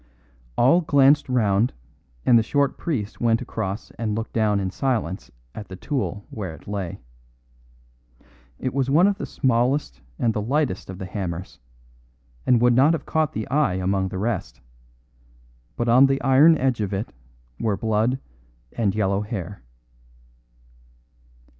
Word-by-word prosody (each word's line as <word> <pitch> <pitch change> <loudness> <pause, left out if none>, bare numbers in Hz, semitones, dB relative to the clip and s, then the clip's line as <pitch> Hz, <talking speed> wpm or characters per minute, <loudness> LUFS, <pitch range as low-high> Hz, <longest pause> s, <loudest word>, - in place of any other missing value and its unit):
All 135 +9 +5
glanced 145 -2 +4
round 110 -2 +2 0.5
and 120 - +5
the 115 - +6
short 140 +4 0
priest 115 -11 -4
went 115 -1 +3
across 105 -1 -5
and 110 -2 -1
looked 115 +1 -5
down 105 -3 +2
in 95 -1 -2
silence 100 - -2 0.2
at 105 - -8
the 95 - -8
tool 105 - -3
where 95 -7 -5
it - - -18
lay. 100 -4 -4 1.6
It 130 - -3
was 135 -1 0
one 160 +6 +5
of 200 +1 +1
the - - -4
smallest 130 +3 0 0.2
and 115 -2 +1
the 105 - -2
lightest 130 -4 -1
of 95 - -7
the 95 - -6
hammers, 90 -2 -5 0.9
and 125 -2 +5
would 120 +1 +4
not 135 +6 +5
have 165 - -3
caught 155 -2 0
the 110 - -4
eye 140 -7 +2
among 95 +1 0
the 95 - -6
rest; 100 - -3 1.2
but 120 - -2
on 125 +4 +6
the 135 0 0
iron 140 +5 +6
edge 130 -4 0
of 100 -1 -2
it 100 +3 -4 0.5
were 105 -3 0
blood 110 +4 +1 0.6
and 105 -4 0
yellow 100 -1 +1
hair. 100 -3 -6
115 Hz, 150 wpm, -23 LUFS, 100-135 Hz, 1.6 s, the